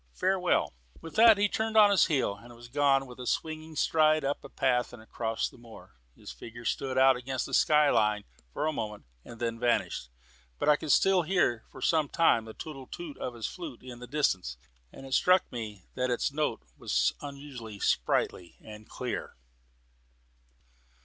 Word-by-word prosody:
Farewell!" 185 - +1 0.3
With 165 - -10
that 225 -1 +8
he 205 +1 +3
turned 220 +2 -1
on 210 -1 +8
his 200 - +4
heel 130 - 0
and 120 +3 -14
was 120 +1 -13
gone 135 0 +2
with 125 -1 -12
a 125 - -6
swinging 155 0 -3
stride 155 0 +3
up 140 +1 -1
the - - -11
path 125 -3 0
and 120 - -10
across 110 0 -3
the - - -15
moor. 115 -2 -14 0.2
His - - -10
figure 115 - -11
stood 130 +2 -2
out 130 0 +6
upon 130 +1 -5
the - - -9
sky 150 -1 +4
line 105 -2 +2 0.3
for 150 - -2
a 155 - 0
moment, 105 - -5 0.2
and 115 - -12
then 115 -1 -2
vanished. 120 - 0 0.5
But - - +1
I 150 - +7
could 150 0 -3 0.4
hear 150 -12 +1
for - - -10
some 155 -4 +2
time 120 -9 +3
the 110 - -10
tootle 135 -4 -8
tootle 335 -5 -8
of 125 - -4
his 115 -2 -5
flute 160 -10 -7
in 125 -2 -9
the 125 - -9
distance, 95 - 0 0.3
and 135 - -11
it 135 - -7
struck 180 +5 +4
me 110 -6 -7
that 125 0 -1
its 125 +3 0
note 150 - -1
was - - +1
unusually 140 -7 -8
sprightly 85 +7 0
and 105 0 -12
clear. - - -5
130 Hz, 185 wpm, -29 LUFS, 115-155 Hz, 0.5 s, that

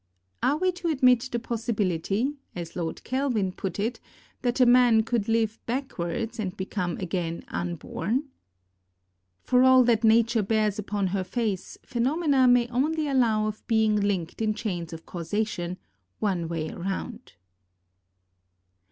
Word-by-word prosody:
Are 285 - +2
we 370 +3 +2
to 360 -1 -5
admit 255 -5 +3
the 240 - 0
possibility, 225 - -1 0.2
as 170 -2 -6
Lord 165 -2 -4
Kelvin 250 -7 0
put 185 0 -5
it, 225 +4 -1 0.4
that 245 0 0
a 255 - +7
man 240 -2 +6
could 225 -2 -1
live 225 -1 +1
backwards 230 -3 -3
and 195 -2 -3
become 185 -2 -3
again 170 -2 -3
unborn? 175 - -2 1.2
For 250 0 +3
all 260 0 +7
that 235 -2 +2
Nature 230 +1 +4
bears 215 0 +1
upon 205 -1 -1
her 195 -2 0
face, 200 -1 -3
phenomena 270 +2 +2
may 245 -1 +5
only 300 +5 0
allow 235 -6 +2
of 215 0 -5
being 220 -2 +3
linked 200 -3 -1
in 215 -1 +1
chains 175 -7 -4
of 165 0 -9
causation, 180 0 -3 0.4
one 185 -5 -1
way 160 -1 -3
round. 195 +6 -5
220 Hz, 135 wpm, -26 LUFS, 190-245 Hz, 1.2 s, a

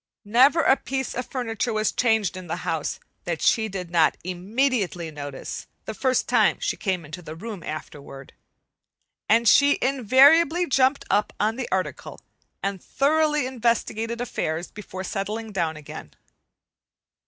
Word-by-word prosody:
Never 265 +10 +5
a 270 - +5
piece 265 -1 -3
of 250 - -4
furniture 240 -3 -2
was 215 0 +1
changed 220 -6 +1
in 185 -2 -9
he - - -1
house - - -3 0.3
that - - -2
she 220 -1 +2
did 180 -3 -6
not 165 -3 +3
immediately 185 - -1
notice, 145 -2 -7 0.2
the 220 - -5
first 255 +4 0
time 225 -4 +3
she - - -1
came 185 -4 -2
into 155 +5 -8
the 160 -2 -9
room 205 +1 -7
afterward; 140 -3 -8 1.0
and 230 +2 +4
she 285 +5 +6
invariably 275 - +4
jumped 270 -2 +2
up 205 +2 +1
on 215 +2 +1
the 255 0 -4
article 185 0 -3 0.4
and 195 -2 -3
thoroughly 300 0 +1
investigated 235 -2 -1
affairs 170 -8 -3
before 190 -2 -8
settling 215 +3 -4
down 165 -5 -1
again. 150 - -10
220 Hz, 140 wpm, -24 LUFS, 180-260 Hz, 1.0 s, she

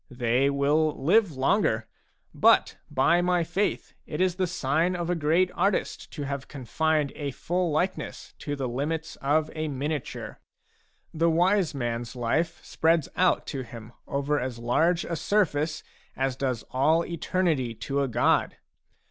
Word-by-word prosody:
They 125 +1 +1
will 145 +2 +1
live 180 +5 +3
longer. 130 - +1 0.5
But, - - +4
by 150 +5 +3
my 180 -1 +2
faith, 185 +5 -2
it 150 - -5
is 185 -1 +2
the 185 -1 +1
sign 165 +1 0
of 175 0 -2
a - - +1
great 165 +3 +2
artist 195 +2 -1
to 145 - -4
have 140 -1 -4
confined 150 +2 -1
a 145 -2 -3
full 175 +6 -1
likeness 175 +5 -2
to 145 - -3
the 135 -2 -3
limits 150 +6 -3
of 150 +3 +1
a 155 0 -3
miniature. 145 0 -4 0.7
The 165 +1 +2
wise 180 +2 +2
rnans 120 -2 -3
life 160 +8 -1
spreads 160 -2 +1
out 185 -1 +2
to 135 - -3
him 115 -2 -10 0.2
over 140 +1 0
as 125 -1 -4
large 160 +9 +1
a 170 - -3
surface 155 -5 0 0.3
as 135 -1 -1
does 130 -4 -2
all 155 +6 +3
eternity 165 -7 -1
to 140 +5 -2
a 140 - +1
god. 120 - +1
150 Hz, 150 wpm, -27 LUFS, 135-170 Hz, 0.7 s, But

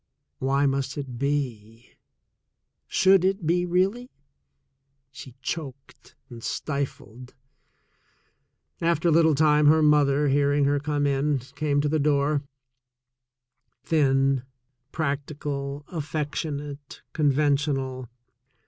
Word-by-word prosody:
Why 135 +2 +1
must 135 +1 -1
it 130 -4 -6
be? 125 -5 -3 1.0
Should 190 -1 +4
it 190 -2 0
be, 175 +2 +1
really? 195 +8 0 1.0
She 130 -2 -11
choked 140 -5 -7
and 120 -3 -11
stifled. 130 -4 -5 1.5
After 170 0 +2
a - - +3
little 160 -1 +4
time 150 0 +4
her 155 +1 +5
mother, 150 -1 +3
hearing 145 +1 +2
her 145 +1 +2
come 145 0 -1
in, 140 +1 +1 0.2
came 145 0 0
to 150 - 0
the 155 +1 0
door 145 0 +1 0.7
— 125 +1 -55
thin, 135 -3 +2 0.5
practical, 145 -1 -4
affectionate, 150 -2 -5
conventional. 140 -3 0
145 Hz, 100 wpm, -25 LUFS, 135-155 Hz, 1.5 s, her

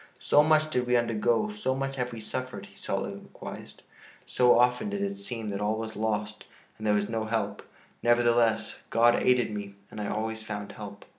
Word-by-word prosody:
"So 145 - +5
much 155 0 +3
did 125 -3 0
we 125 - +3
undergo, 120 - +2
so 210 -11 -1
much 135 0 -2
have 125 -1 -2
we 115 -2 -7
suffered," 130 +3 -5
he - - -18
soliloquized, - - -6 0.4
"so 125 -1 +4
often 125 - +3
did 200 -1 -2
it 200 0 -2
seem 120 - -5
that 100 0 -3
all 105 +1 +1
was 110 0 -5
lost 105 -1 -2 0.3
and 110 - -3
that - - +3
there 105 - +4
was 105 0 0
no 110 -1 -2
help; 105 -2 -2 0.4
nevertheless, 120 -2 +3
God 120 +1 +5
aided 125 -3 +3
me 100 -1 -6 0.2
and 105 - -6
I 105 - -2
always 110 +1 -2
found 105 -2 -5
help. 100 -1 -9
115 Hz, 195 wpm, -28 LUFS, 105-125 Hz, 0.4 s, So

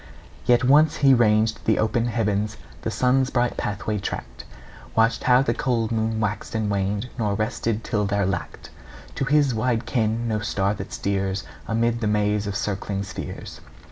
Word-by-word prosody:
Yet 120 0 +4
once 145 +4 +5
he 135 - +8
ranged 110 -2 +3
the 110 - +3
open 115 +2 +1
heavens, 105 -2 -1 0.2
The - - -2
sun's 130 +1 +2
bright 120 -2 0
pathway 105 +1 -2
tracked; 60 -9 -6 0.5
Watched 115 +1 +2
how 125 +1 +5
the - - +1
cold 120 -5 -1
moon 110 0 0
waxed 105 0 -3
and 110 -2 0
waned; 100 +4 -1
Nor 105 -3 0
rested, 110 +1 -1
till 105 -2 0
there 100 0 +1
lacked 90 -2 -4 0.4
To 135 - -2
his 145 -1 +3
wide 115 +1 0
ken 115 0 0
no 110 -2 0
star 100 -1 0
that 105 - -7
steers 95 0 -1 0.2
Amid 115 +1 0
the 110 - 0
maze 105 0 +1
of 100 - -3
circling 100 0 -2
spheres. 100 - -7
110 Hz, 170 wpm, -24 LUFS, 105-120 Hz, 0.5 s, he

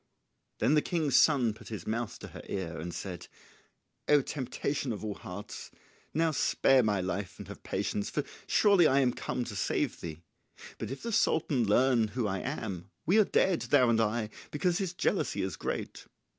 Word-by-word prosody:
Then 145 - +2
the 150 - +5
king's 155 -7 0
son 130 -8 +5
put 110 +1 -14
his 105 -7 -6
mouth 115 0 -2
to - - -9
her - - -9
ear 85 -4 -3
and 85 +2 -5
said 85 0 -6 0.8
"O 145 -2 +5
temptation 140 0 -3
of 110 -1 -5
all 105 - -2
hearts, 100 +2 -8 0.4
now 160 +1 +2
spare 135 -2 +3
my 105 -4 +1
life 95 +1 -3
and - - -9
have - - -9
patience, 100 - -2
for - - -1 0.2
surely 200 -6 +5
I 135 - +4
am 125 -2 +2
come 125 - -3
to 115 -3 -7
save 95 - -1
thee; 80 0 -7 0.6
but - - -4
if 135 - -6
the 230 - -3
Sultan 150 - +2
learn 120 +1 +4
who 120 +2 -2
I 95 -2 -1
am 100 - -4 0.2
we 190 +7 +4
are 215 - +6
dead, 185 -8 +2
thou 125 0 +5
and 115 -1 +3
I, 110 0 0 0.2
because 175 +3 0
his 190 -3 -2
jealousy - - 0
is - - -3
great." - - -5
120 Hz, 185 wpm, -30 LUFS, 105-150 Hz, 0.8 s, are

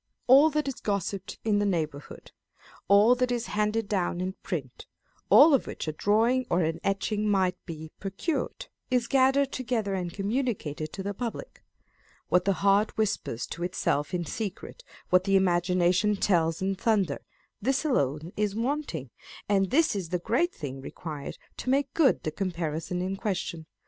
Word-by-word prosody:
All 275 +5 +7
that 300 -1 -1
is 270 - -4
gossiped 200 -1 -3
in 210 -2 +2
the 205 - +1
neighbourhood, 155 -6 -4 0.6
all 205 +5 +6
that 250 0 0
is 240 -1 -1
handed 210 +1 0
down 180 -4 -1
in 185 +1 -2
print, 135 -8 -5 0.4
all 300 +2 +8
of 270 - +2
which - - -6
a - - 0
drawing 225 +9 +2
or 175 0 +2
an 160 +1 -1
etching 210 +2 0
might 190 -3 +2
be 160 -2 -7
procured, 195 - -3 0.2
is 250 -2 +2
gathered 270 +2 +3
together 230 -6 -2
and 180 -2 -2
communicated 195 - -2
to 195 - -5
the 200 +1 -3
public: 240 - -6 0.7
what 180 0 +3
the 195 - +3
heart 200 +2 +3
whispers 200 - -1
to 170 - -8
itself 150 -4 -1
in 175 -2 -2
secret, 220 - -6 0.3
what 180 +1 +4
the 195 -1 +2
imagination 180 +2 +3
tells 170 -4 +1
in 195 +1 +1
thunder, 195 -6 +1 0.4
this 270 +4 0
alone 155 - 0
is 210 -1 -1
wanting, 230 - -2 0.4
and 195 -2 +2
this 310 -3 +3
is 185 -5 -3
the 180 - 0
great 245 - +1
thing 135 -4 -7
required 150 0 -7 0.2
to - - -4
make 275 0 +1
good 300 -6 +3
the 155 - -2
com 190 +4 -2
parison 165 +1 -3
in 190 +1 -3
question. 175 -5 -3
195 Hz, 165 wpm, -27 LUFS, 175-235 Hz, 0.7 s, all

